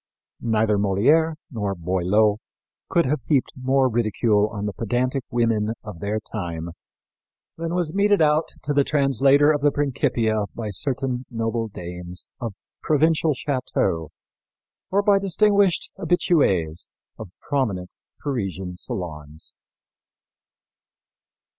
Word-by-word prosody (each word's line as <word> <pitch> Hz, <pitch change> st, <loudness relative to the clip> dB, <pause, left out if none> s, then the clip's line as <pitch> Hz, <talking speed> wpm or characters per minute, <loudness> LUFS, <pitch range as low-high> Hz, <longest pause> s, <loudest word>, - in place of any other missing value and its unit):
Neither 110 Hz, -2 st, +2 dB
Molière 145 Hz, +12 st, +3 dB, 0.2 s
nor 105 Hz, -5 st, -2 dB
Boileau 95 Hz, +5 st, +2 dB, 0.5 s
could 170 Hz, -, +3 dB
have 140 Hz, +1 st, 0 dB
heaped 140 Hz, -5 st, +1 dB
more 130 Hz, 0 st, +2 dB
ridicule 110 Hz, -2 st, +2 dB
on 105 Hz, -1 st, -5 dB
the 105 Hz, -, -2 dB
pedantic 125 Hz, +5 st, -1 dB
women 115 Hz, -2 st, +1 dB
of 105 Hz, -6 st, -8 dB
their 105 Hz, +4 st, -1 dB
time 85 Hz, -6 st, -5 dB, 0.9 s
than 165 Hz, +1 st, -3 dB
was 170 Hz, -3 st, -1 dB
meted 205 Hz, +1 st, +3 dB
out 155 Hz, 0 st, +3 dB, 0.2 s
to 145 Hz, -, -1 dB
the 140 Hz, 0 st, +4 dB
translator 140 Hz, +1 st, +4 dB
of 145 Hz, -2 st, 0 dB
the 145 Hz, -, +5 dB
Principia 115 Hz, -7 st, 0 dB
by 110 Hz, -3 st, -4 dB
certain 130 Hz, +2 st, -2 dB
noble 115 Hz, -1 st, -2 dB
dames 90 Hz, -2 st, -7 dB
of 115 Hz, -5 st, -4 dB, 0.3 s
provincial 155 Hz, 0 st, +2 dB
châteaux 125 Hz, -, -1 dB, 0.8 s
or 200 Hz, +2 st, +2 dB
by 200 Hz, -1 st, +4 dB
distinguished 200 Hz, -1 st, +2 dB
habituées 140 Hz, -, +1 dB, 0.3 s
of 110 Hz, -, -7 dB
prominent 105 Hz, -11 st, -2 dB, 0.3 s
Parisian 95 Hz, -9 st, -3 dB
salons. 75 Hz, -5 st, -6 dB
120 Hz, 115 wpm, -23 LUFS, 100-145 Hz, 0.9 s, the